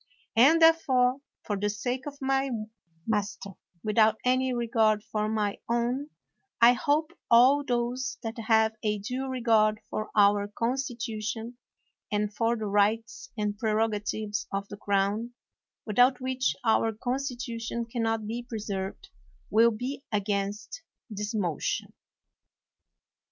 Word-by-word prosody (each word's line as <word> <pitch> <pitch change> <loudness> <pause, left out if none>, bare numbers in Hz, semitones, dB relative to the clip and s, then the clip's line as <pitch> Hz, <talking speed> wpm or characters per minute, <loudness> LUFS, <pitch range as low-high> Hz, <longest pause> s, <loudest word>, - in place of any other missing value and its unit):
And 275 +9 +6
therefore, 265 -6 +4 0.3
for 205 - -2
the 205 +1 0
sake 245 +6 -3
of 285 -1 -7
my 270 0 +1 0.6
mas 210 -2 0
ter, 200 - -9 0.3
without 215 0 +3
any 255 +1 +2
regard 225 -3 +2
for 215 -1 -2
my 210 -2 -1
own, 240 +5 0 0.5
I 235 +1 +8
hope 305 +4 0 0.2
all 255 +5 +6
those 250 +1 -2
that 225 +1 -5
have 220 -1 +4
a 210 -1 0
due 250 +6 -4
regard 225 -4 +2
for 215 - -3
our 205 -1 +4
constitution 230 -1 -3 0.5
and 210 0 -1
for 230 +2 +1
the 220 - -4
rights 210 +2 0
and 210 -1 -2
prerogatives 215 -1 -1
of 200 0 -3
the 205 - -8
crown, 205 +4 -1 0.5
without 245 +4 +4
which 260 0 -1
our 225 0 +3
constitution 240 -1 -3
can 230 +1 -4
not 225 -1 0
be 230 +3 -4
pre 240 -2 -6
served, 200 - -5 0.4
will 230 +2 +6
be 250 +5 -5
against 205 - -2 0.3
this 210 +2 -4
motion. 175 -7 -2
225 Hz, 130 wpm, -28 LUFS, 210-250 Hz, 0.6 s, I